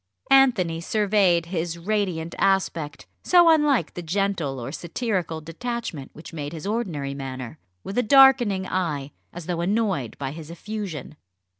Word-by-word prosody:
Anthony 220 -12 +4
surveyed 195 -3 +2
his 170 -1 -3
radiant 175 -3 -2
aspect 185 -6 0 0.2
so 350 -2 +6
unlike 295 - +2
the 175 - -6
gentle 175 -6 -1
or 120 +3 -5
satirical 170 - -3
detachment 165 - -5
which 155 - -11
made 145 -1 -5
his 160 +1 -7
ordinary 180 -11 -2
manner 130 0 -7 0.2
with 200 - -2
a - - +5
darkening 245 -6 +5
eye, 150 -7 -2 0.2
as 175 -1 -8
though 170 -1 -2
annoyed 190 - -1
by 135 -1 -4
his 155 +1 -9
effusion. 170 -5 -6
175 Hz, 140 wpm, -24 LUFS, 155-210 Hz, 0.2 s, so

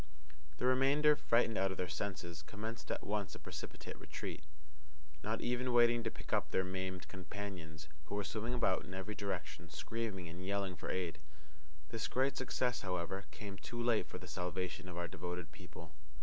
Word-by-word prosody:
The - - 0
remainder, 140 +4 +7
frightened 115 -5 +4
out 95 0 +4
of 95 - -3
their 90 - +1
senses, 85 -5 -2
commenced 110 +7 -5
at - - -1
once 105 -3 0
a - - -7
precipitate - - -6
retreat, - - -4 0.8
not 110 +1 0
even 125 +1 +2
waiting 120 0 +7
to 115 - 0
pick - - -7
up - - +3
their 95 - +3
maimed 95 0 -2
companions, 90 -5 -5 0.2
who 90 - -3
were 105 - +1
swimming 115 +4 -1
about 95 -6 +4
in 90 +3 -6
every 95 +3 -2
direction, 90 -4 -3
screaming 100 +2 -2
and 85 +2 -6
yelling 100 -1 0
for - - -4
aid. 90 -3 0 0.7
This 115 -1 -1
great 135 +2 +3
success, 125 -1 +1
however, 95 +1 -1
came 100 -2 -6
too 120 - -5
late 120 -2 +4
for - - -5
the - - -9
salvation 90 0 -2
of 90 - -5
our 85 0 0
devoted 90 -2 -4
people. 85 0 -10
95 Hz, 180 wpm, -38 LUFS, 90-115 Hz, 0.8 s, remainder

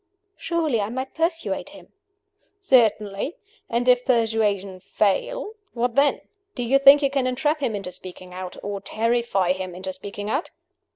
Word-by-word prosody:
"Surely 315 -9 0
I 200 - -2
might 260 +3 -5
persuade 330 +1 -1
him?" - - -15 0.7
"Certainly. 225 - +2 0.3
And 240 +2 0
if 250 0 +5
persuasion 215 -6 +1
fail 405 - -1 0.2
what 240 0 -1
then? 280 +3 +3 0.3
Do 245 - -2
you 265 +4 +3
think 275 +1 +8
you 275 - +2
can 270 -2 +1
entrap 295 +5 0
him 240 -6 -1
into 195 -3 -5
speaking 180 0 -10
out? 185 0 -7
or 200 -1 -4
terrify 225 -5 +1
him 185 -1 -6
into 190 +1 -5
speaking 200 +2 -7
out?" 275 +9 -1
230 Hz, 155 wpm, -23 LUFS, 195-275 Hz, 0.7 s, think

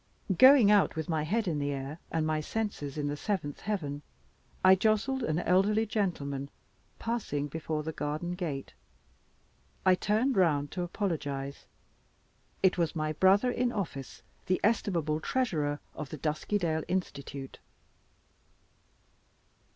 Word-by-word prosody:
Going 260 -2 +8
out 205 -2 +4
with 160 0 -4
my 160 -2 +1
head 210 +8 0
in 155 -4 0
the 145 0 -1
air, 140 +3 -5
and 160 -1 0
my 155 0 0
senses 155 -5 -3
in 150 - -1
the 145 - -2
seventh 150 -4 -3
heaven, 150 -9 -3 0.6
I 185 - +9
jostled 220 +7 +2
an 155 -9 0
elderly 195 +5 +3
gentleman 140 -10 -2 0.5
passing 220 -12 -2
before 155 0 -3
the 160 - -3
garden 150 +3 -3
gate. 160 -7 -4 1.1
I 185 - +7
turned 215 +7 +1
round 150 -6 +2
to 180 - -3
apologize; 145 -7 -3 1.0
it 190 -1 +4
was 170 0 0
my 155 -1 -1
brother 195 +9 +4
in 245 0 0
office, 165 - -5 0.2
the 185 - +2
estimable 170 -8 +1
Treasurer 155 - -1
of 150 -3 -6
the 155 - -6
Duskydale 160 +2 -1
Institute. 140 -7 -4
165 Hz, 130 wpm, -30 LUFS, 145-205 Hz, 1.1 s, I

